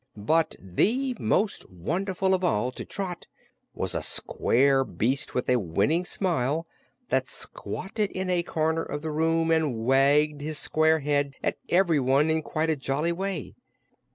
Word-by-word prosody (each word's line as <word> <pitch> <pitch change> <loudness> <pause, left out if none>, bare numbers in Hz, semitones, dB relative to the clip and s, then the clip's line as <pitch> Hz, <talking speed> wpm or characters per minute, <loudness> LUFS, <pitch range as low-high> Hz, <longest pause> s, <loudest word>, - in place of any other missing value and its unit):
But 160 +11 +1
the 245 - 0
most 210 0 0
wonderful 185 - -1
of 185 0 0
all 125 -7 +1
to - - -7
Trot 185 -3 -5 0.5
was - - -2
a - - -1
square 135 +2 +2
beast 130 +2 -2
with 125 - -1
a 125 -1 +3
winning 105 - +1
smile, 165 -5 0 0.4
that 130 0 +1
squatted 200 +8 -4
in 185 -1 -4
a 180 -1 +2
corner 160 -1 0
of 145 -1 -5
the 160 - -3
room 165 +1 +1
and 145 -9 +1
wagged 145 +3 +3
his 155 +1 -3
square 155 +1 +2
head 145 -1 0
at - - -1
everyone 150 -5 +3
in 160 0 +1
quite 155 +1 -1
a - - +1
jolly 140 +4 -1
way. 185 -3 -4
155 Hz, 155 wpm, -26 LUFS, 135-175 Hz, 0.5 s, a